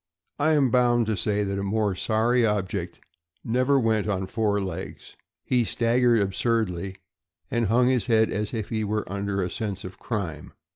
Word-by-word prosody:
I 155 +2 +3
am 140 -5 +3
bound 120 -1 +3
to 110 0 0
say 105 +1 0
that 100 0 -2
a - - -2
more 105 0 0
sorry 115 +5 +1
object 105 -5 -2 0.4
never 130 +4 +2
went 110 -3 +1
on 95 -2 -1
four 105 0 0
legs. 95 -2 -6 0.3
He 125 -2 +2
staggered 120 +1 +2
absurdly, 95 -2 -1 0.6
and 120 -2 +1
hung 120 +4 +3
his 125 -2 +1
head 110 -2 +3
as 105 +1 -2
if 110 -4 -4
he 110 -2 -1
were 105 +1 -1
under 100 -1 -1
a 90 - -2
sense 100 -4 -4
of 90 0 -9
crime. 95 - -4
110 Hz, 175 wpm, -25 LUFS, 100-120 Hz, 0.6 s, I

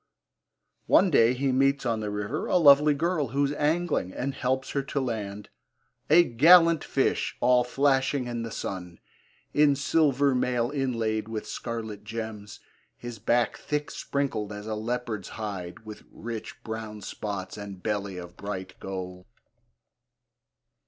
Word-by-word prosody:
One 190 -1 +5
day 120 -3 +5
he 135 +1 0
meets 135 +1 +2
on 115 -2 0
the 105 -1 -3
river 105 0 -3
a - - +3
lovely 145 -2 +6
girl 160 -1 0
who 140 +4 +1
is 140 - -1
angling, 150 - 0
and 135 +2 -3
helps 130 0 -1
her 140 - 0
to 140 +1 -3
land 105 -5 -4 0.6
A 175 - +7
gallant 165 +5 +6
fish, 135 - 0
all 125 0 +4
flashing 135 +1 +1
in 120 -1 -4
the 115 - -4
sun 90 -4 -6 0.5
In 145 -1 +4
silver 140 -1 +2
mail 125 -1 0
inlaid 115 -6 -1
with 110 -1 -5
scarlet 110 -3 -5
gems, 110 -2 -6 0.4
His 120 -2 -8
back 120 +3 +1
thick 150 0 -3
sprinkled 115 -7 -2
as 105 0 -7
a 110 - -3
leopard's 110 -2 -3
hide 100 -3 -6
With 110 -1 -9
rich 115 -1 -7
brown 110 -1 -6
spots, 100 -3 -5
and 100 -3 -8
belly 100 -3 -2
of 85 0 -9
bright 95 -2 -6
gold. 90 -1 -6
115 Hz, 145 wpm, -27 LUFS, 105-140 Hz, 0.6 s, A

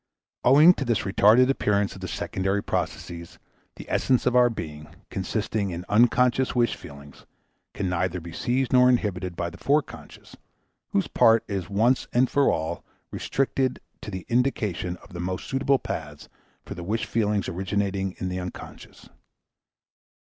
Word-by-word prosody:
Owing 150 +7 +7
to - - +2
this 115 -5 0
retarded 110 +6 +4
appearance 100 -6 0
of 95 - -12
the 95 - -4
secondary 95 +3 -2
processes, 85 -1 -4 0.4
the - - -11
essence 130 -2 +1
of 125 0 +2
our 125 -1 +6
being, 75 -8 -7 0.2
consisting 100 -3 -2
in 90 0 -6
unconscious 125 +4 +3
wish 120 -1 +2
feelings, 70 -2 -13 0.5
can 100 - -2
neither 90 0 -1
be 85 0 -10
seized 125 +7 -1
nor 125 0 +6
inhibited 95 -7 -1
by 85 0 -3
the - - -13
foreconscious, 145 +2 -2 0.5
whose - - 0
part 115 0 +4
is 95 -3 -4
once 115 +6 +2 0.2
for 140 +2 +2
all 80 0 -3 0.3
restricted 135 -1 -1 0.2
to - - -7
the 95 -3 -6
indication 110 -8 -1
of - - -16
the 85 - -6
most 90 +1 -3
suitable 135 +1 +2
paths 75 - -7 0.4
for - - -7
the 85 - -8
wish 110 +5 -2
feelings 105 -3 0
originating 95 +1 -2
in 95 - -3
the 90 0 -3
unconscious. 90 0 -10
100 Hz, 150 wpm, -25 LUFS, 90-125 Hz, 0.5 s, Owing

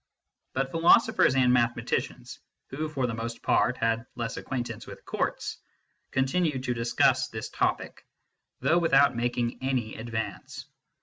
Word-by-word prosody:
But 135 0 -1
philosophers 170 - +4
and 125 -2 +4
mathematicians 120 -1 -1 0.3
who 155 +3 -3
for 135 -4 -1
the 120 - -2
most 115 +1 -5
part 125 - +2
had 115 +1 0
less 115 -2 -3
acquaintance 120 -3 -5
with - - -11
courts - - -2 0.5
continued 135 0 0
to 125 - 0
discuss 120 0 +2
this - - -6
topic, - - -2 0.6
though 170 - +3
without 140 -5 +4
making 120 0 -1
any 130 -4 -1
advance. 110 0 -5
125 Hz, 130 wpm, -27 LUFS, 115-135 Hz, 0.6 s, philosophers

